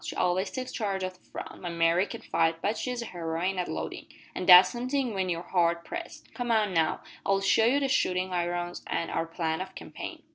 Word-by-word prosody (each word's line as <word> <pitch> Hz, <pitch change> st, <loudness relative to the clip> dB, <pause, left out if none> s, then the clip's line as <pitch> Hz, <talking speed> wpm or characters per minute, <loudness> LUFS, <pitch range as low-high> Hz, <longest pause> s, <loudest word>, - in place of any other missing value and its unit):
She -, -, -5 dB
always 185 Hz, +2 st, +1 dB
takes 255 Hz, -1 st, -5 dB
charge 195 Hz, -4 st, -2 dB
o' 185 Hz, -, -1 dB
the 185 Hz, 0 st, -19 dB
front. -, -, -9 dB
My 175 Hz, -, -4 dB
Mary 170 Hz, +2 st, +2 dB
can't -, -, -8 dB
fight, 165 Hz, 0 st, +2 dB
but 205 Hz, +6 st, 0 dB
she's 245 Hz, +1 st, -3 dB
a 230 Hz, -, -9 dB
heroine 175 Hz, +2 st, -2 dB
at 180 Hz, -, -1 dB
loadin' 80 Hz, 0 st, -5 dB, 0.3 s
an' 180 Hz, -, -4 dB
that's 180 Hz, 0 st, +10 dB
somethin' 255 Hz, 0 st, -1 dB
when 190 Hz, -2 st, -1 dB
you're 170 Hz, 0 st, -2 dB
hard 170 Hz, -2 st, +1 dB
pressed! 340 Hz, -2 st, -8 dB
Come, 245 Hz, -1 st, -4 dB
now, 205 Hz, -8 st, +2 dB, 0.2 s
I'll 195 Hz, 0 st, +2 dB
show 195 Hz, +3 st, +3 dB
ye 260 Hz, +4 st, +3 dB
the 280 Hz, -1 st, +1 dB
shootin' 185 Hz, -7 st, +1 dB
irons 175 Hz, 0 st, -2 dB
an' 165 Hz, -, -2 dB
our 165 Hz, -, -1 dB
plan 165 Hz, 0 st, -2 dB
of 190 Hz, 0 st, -7 dB
campaign." -, -, -8 dB
185 Hz, 215 wpm, -28 LUFS, 170-220 Hz, 0.3 s, that's